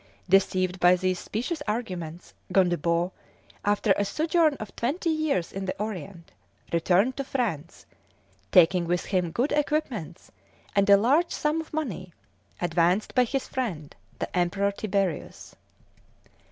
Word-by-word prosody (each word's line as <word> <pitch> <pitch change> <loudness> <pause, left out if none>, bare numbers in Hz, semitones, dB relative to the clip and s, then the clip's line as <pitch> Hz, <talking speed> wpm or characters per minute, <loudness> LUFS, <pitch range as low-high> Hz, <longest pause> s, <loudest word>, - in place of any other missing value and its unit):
Deceived 185 -1 +2
by 180 0 +6
these 185 0 -1
specious 255 +9 -4
arguments, 180 -7 -4 0.2
Gondebaud, 175 -1 +2 0.5
after 205 0 +2
a 205 - +1
sojourn 315 - +2
of 215 -6 -9
twenty 320 +8 -1
years 310 - 0
in 195 0 -4
the 185 - -4
Orient, 195 -4 -6 0.4
returned 185 +9 +2
to 275 - -1
France, 215 - -3 0.7
taking 175 0 +5
with 175 0 0
him 180 -3 0
good 240 - -1
equipments 290 - -2 0.4
and 200 0 +3
a 200 - +9
large 280 - +3
sum 305 +2 0
of 320 - -13
money, 265 - -4 0.5
advanced 175 +3 +1
by 250 -2 +4
his 270 +2 -3
friend 180 - -4 0.2
the - - -5
Emperor 195 +3 +1
Tiberius. 195 -4 -3
195 Hz, 130 wpm, -26 LUFS, 175-255 Hz, 0.7 s, a